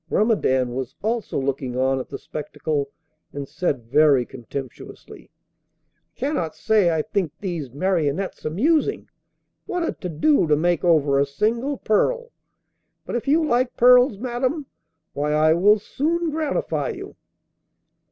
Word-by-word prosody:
Grumedan 130 - +1
was 130 0 -5
also 225 +1 -2
looking 135 -2 -3
on 130 +1 +1
at 130 - -7
the - - -5
spectacle, 150 -1 -4 0.4
and 140 -1 -5
said 145 -4 -2
very 140 +1 +4
contemptuously: 130 +2 -9 0.9
'I - - -35
cannot 255 - -2
say 215 -5 +2
I 160 -2 0
think 185 -4 -2
these 170 -9 -4
marionettes 170 +3 -1
amusing. 300 - 0 0.6
What 350 -2 -1
a - - 0
to 180 - -7
do 170 - +2
to 150 - +4
make 170 +2 +1
over 150 -5 +3
a 140 - +3
single 230 - -1
pearl! 475 - 0 0.7
But - - -5
if 240 - -3
you 310 +3 +3
like 250 -2 0
pearls, 250 -2 +6
madam, 255 +6 -2 0.5
why, 150 +1 -1
I 155 +1 +4
will 205 +6 +5
soon 325 +10 -1
gratify 310 -1 -1
you. 395 +2 -9
175 Hz, 140 wpm, -23 LUFS, -, 0.9 s, pearls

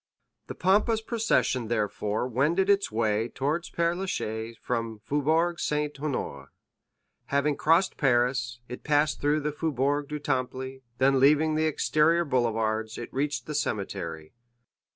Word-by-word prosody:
The - - -6
pompous 210 +4 +2
procession 220 - 0
therefore 105 0 -1
wended 155 - +2
its 200 - +1
way 110 0 +1
towards 150 +8 -2
Père 170 0 0
Lachaise 115 - -4
from 115 -2 -2
the - - -20
Faubourg 160 +7 +1
Saint 150 0 -1
Honoré. 135 - -4 0.8
Having 140 +1 +1
crossed 165 +5 +3
Paris, 120 -2 +1
it 125 - -8
passed 150 0 +1
through 150 +1 +2
the 150 +1 -1
Faubourg 145 -1 -1
du 150 - -4
Temple, 130 -1 -3 0.2
then 135 0 +3
leaving 150 +3 +4
the 155 +1 +1
exterior 155 +2 +2
boulevards, 110 -4 0
it 120 - -7
reached 145 +2 -1
the 150 - -5
cemetery. 85 - -3
140 Hz, 135 wpm, -27 LUFS, 120-155 Hz, 0.8 s, leaving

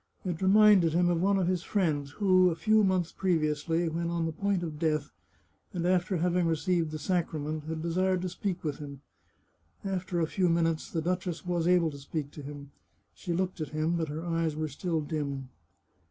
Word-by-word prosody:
It 175 -2 -3
reminded 195 -4 +6
him 175 +1 +3
of 170 -1 +1
one 195 +1 +3
of 190 - +1
his 180 -1 0
friends 155 -8 0
who, 185 -2 +4
a 165 - -2
few 215 +4 +3
months 185 -3 +1
previously, 165 -1 0
when 170 +1 -2
on 170 -1 -1
the 165 - -1
point 195 +2 -1
of 155 -3 -5
death, 155 -3 0 0.6
and 170 -1 -1
after 185 +1 +2
having 175 +1 +1
received 165 0 +1
the 155 - -5
sacrament, 155 -2 -2
had 160 0 -4
de 170 - -1
sired 185 0 +1
to 185 - -1
speak 180 0 -3
with 150 -3 -3
him. 140 -2 -8 0.8
After 185 -2 -2
a 165 - +2
few 180 +2 +1
minutes, 165 -1 +1
the 165 -2 -2
duchess 180 0 -2
was 175 -2 0
able 175 -3 +4
to 140 - -9
speak 145 +1 -5
to 150 - -9
him. 140 0 -9 0.4
She 175 - -6
looked 180 0 -1
at 155 - -3
him, 160 +2 +1
but 165 -2 -1
her 155 +3 -5
eyes 165 -2 0
were 155 0 -2
still 165 +3 -2
dim. 140 -3 -4
170 Hz, 200 wpm, -29 LUFS, 155-180 Hz, 0.8 s, reminded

